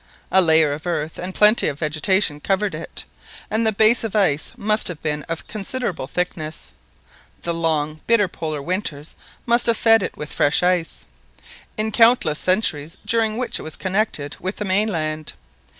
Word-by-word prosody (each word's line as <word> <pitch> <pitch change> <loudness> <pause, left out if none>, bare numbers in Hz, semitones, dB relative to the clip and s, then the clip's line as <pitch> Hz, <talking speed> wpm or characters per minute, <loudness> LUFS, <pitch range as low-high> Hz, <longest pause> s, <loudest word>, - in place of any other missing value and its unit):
A 190 - +6
layer 160 -3 +4
of 155 +4 -7
earth 160 -2 -3
and 185 +1 -5
plenty 210 +2 +5
of 140 - -3
vegetation 155 +2 +1
covered 195 +3 -1
it, 155 - -7 0.5
and 220 +1 +2
the - - +4
base 220 +3 +4
of 220 -3 -4
ice 160 -8 +1
must 215 +1 +1
have 175 -4 -5
been 150 -1 -1
of 165 -1 -4
considerable 215 - -4
thickness. 160 0 -3 0.7
The 170 - -1
long 155 -2 -1
bitter 220 -4 +4
Polar 155 -4 -5
winters 165 -4 -4 0.3
must 235 0 +4
have 230 -1 +2
"fed 225 -1 +5
it - - -4
with 150 - -6
fresh 145 +4 +2
ice," 180 -2 0 0.7
in 215 +1 -1
the - - -3
countless 225 -10 +4
centuries 170 -5 0
during 225 -1 +1
which 250 0 -1
it - - -7
was 155 - -7
connected 190 -7 -2
with 185 +2 -3
the 210 - -4
mainland. 165 -6 -1
180 Hz, 170 wpm, -21 LUFS, 155-215 Hz, 0.7 s, A